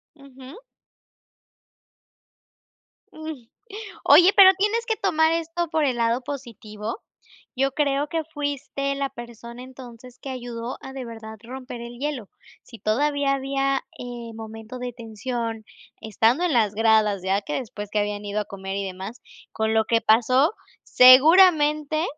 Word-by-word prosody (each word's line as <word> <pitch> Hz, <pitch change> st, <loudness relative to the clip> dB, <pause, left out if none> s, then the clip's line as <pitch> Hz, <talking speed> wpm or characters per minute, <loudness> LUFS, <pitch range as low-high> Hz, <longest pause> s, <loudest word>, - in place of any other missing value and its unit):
Ujú. 270 Hz, 0 st, -14 dB, 2.6 s
Mm, 315 Hz, -6 st, -8 dB, 0.6 s
oye, 360 Hz, +2 st, +7 dB
pero 385 Hz, -2 st, +10 dB
tienes 430 Hz, +4 st, 0 dB
que 445 Hz, -2 st, 0 dB
tomar 320 Hz, -5 st, +2 dB
esto 335 Hz, +1 st, -2 dB
por 315 Hz, -1 st, 0 dB
el 255 Hz, -3 st, 0 dB
lado 235 Hz, +2 st, 0 dB
positivo, 230 Hz, -, -7 dB, 0.6 s
yo 270 Hz, 0 st, +1 dB
creo 285 Hz, 0 st, 0 dB
que 325 Hz, +1 st, -2 dB
fuiste 280 Hz, -1 st, -3 dB
la 275 Hz, 0 st, -2 dB
persona 235 Hz, +1 st, -10 dB
entonces 250 Hz, -1 st, -13 dB
que 275 Hz, -, -8 dB
ayudó 240 Hz, -1 st, -6 dB
a 265 Hz, -, -9 dB
de 265 Hz, -1 st, -6 dB
verdad 220 Hz, -1 st, -9 dB
romper 250 Hz, 0 st, -8 dB
el 235 Hz, 0 st, -9 dB
hielo. 275 Hz, -7 st, -4 dB, 0.3 s
Si 230 Hz, -, -14 dB
todavía 285 Hz, +6 st, 0 dB
había, 275 Hz, 0 st, -1 dB, 0.2 s
eh, 240 Hz, -2 st, -8 dB
momento 225 Hz, +2 st, -9 dB
de 245 Hz, 0 st, -5 dB
tensión, 230 Hz, 0 st, -5 dB, 0.4 s
estando 225 Hz, -, +1 dB
en 350 Hz, -, +1 dB
las 215 Hz, -5 st, +2 dB
gradas, 215 Hz, -3 st, +2 dB
ya 190 Hz, +1 st, +1 dB
que -, -, -5 dB
después 210 Hz, -5 st, -6 dB
que 210 Hz, -, -1 dB
habían 205 Hz, 0 st, -2 dB
ido 205 Hz, +1 st, -2 dB
a -, -, -3 dB
comer 195 Hz, -1 st, -7 dB
y 200 Hz, -, -2 dB
demás, 190 Hz, +5 st, -8 dB, 0.3 s
con 220 Hz, 0 st, -1 dB
lo 220 Hz, 0 st, +3 dB
que 230 Hz, 0 st, +2 dB
pasó, 255 Hz, -, +3 dB, 0.3 s
seguramente 305 Hz, +2 st, +6 dB
250 Hz, 145 wpm, -23 LUFS, 225-285 Hz, 2.6 s, pero